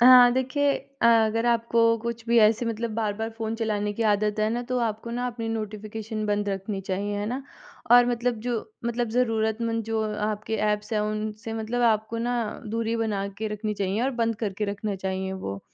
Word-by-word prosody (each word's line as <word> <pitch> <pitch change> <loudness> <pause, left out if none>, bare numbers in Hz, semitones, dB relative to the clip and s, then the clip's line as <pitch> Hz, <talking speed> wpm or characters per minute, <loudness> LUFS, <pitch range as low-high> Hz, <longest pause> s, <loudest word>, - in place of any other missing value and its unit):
हाँ, 245 0 +9
देखिए 275 +3 +1 0.3
अ, - - +6
अगर 225 0 +4
आपको 230 0 +3
कुछ 235 0 -5
भी 235 0 +4
ऐसे 220 +2 +4
मतलब 230 0 -2
बार-बार 220 0 -1
फ़ोन 225 0 -2
चलाने 210 -2 -1
की 230 - -2
आदत 210 0 +2
है 215 - +3
ना, 240 +2 -1
तो 250 0 -1
आपको 230 0 -2
ना 245 +1 -2
अपनी 230 -2 -4
नोटिफ़िकेशन 215 0 -4
बंद 205 0 0
रखनी 195 0 -3
चाहिए। 200 +2 -2
है 205 - -2
ना? 255 +4 -3 0.5
और 245 0 +8
मतलब 240 -1 0
जो 240 +1 -1 0.3
मतलब 235 0 0
ज़रूरतमंद 225 -1 0
जो 220 0 -1 0.2
आपके 215 +1 -2
ऐप्स 210 +1 0
हैं, 215 - +2
उनसे 215 +1 -3
मतलब 225 +2 -2
आपको 225 0 +2
ना 240 +1 0 0.3
दूरी 230 +1 -1
बना 210 -3 -1
के 220 0 -2
रखनी 210 0 -3
चाहिए 200 +2 -1
और 265 - +2
बंद 230 -1 +1
करके 210 -1 -2
रखने 200 0 -3
चाहिए 190 0 -3
वो। 100 - -5
220 Hz, 190 wpm, -26 LUFS, 210-235 Hz, 0.5 s, हाँ